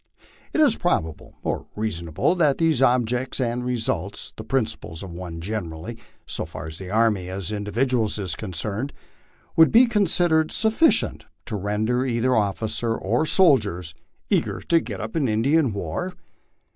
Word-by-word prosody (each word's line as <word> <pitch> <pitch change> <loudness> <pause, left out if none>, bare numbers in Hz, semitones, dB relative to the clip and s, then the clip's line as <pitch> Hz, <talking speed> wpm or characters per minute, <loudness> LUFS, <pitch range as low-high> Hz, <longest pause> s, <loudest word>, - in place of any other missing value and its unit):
Is 300 -7 +4
it - - -10
probable 80 - -1
or - - -2
reasonable 85 - -1
that 155 -6 +2
these 160 -5 +2
objects 125 0 +1
and 125 -1 -1
results, 125 -2 -2
the - - -8
principal 115 - -2
ones 85 -2 -7
generally, 100 0 -4 0.3
so - - -4
far 80 -1 -8
as 80 0 -6
the 95 -2 -7
army 105 -4 +1
as 95 0 -4
individuals 110 +2 0
is 95 -5 -2
concerned, 105 - -3 0.6
would 160 0 +6
be 240 +3 +7
considered 175 -8 +2
sufficient 220 +9 +2 0.2
to 110 - -4
render 105 +5 0
either 125 0 +1
officers 110 +2 0
or 120 +10 0
soldiers 105 - +3 0.2
" - - -45
eager - - +1
tc 165 -1 +1
get 105 -5 -5
up 110 +1 -6
an 150 -5 +1
Indian 130 +6 +2
war 100 - -4
115 Hz, 145 wpm, -24 LUFS, 95-135 Hz, 0.6 s, be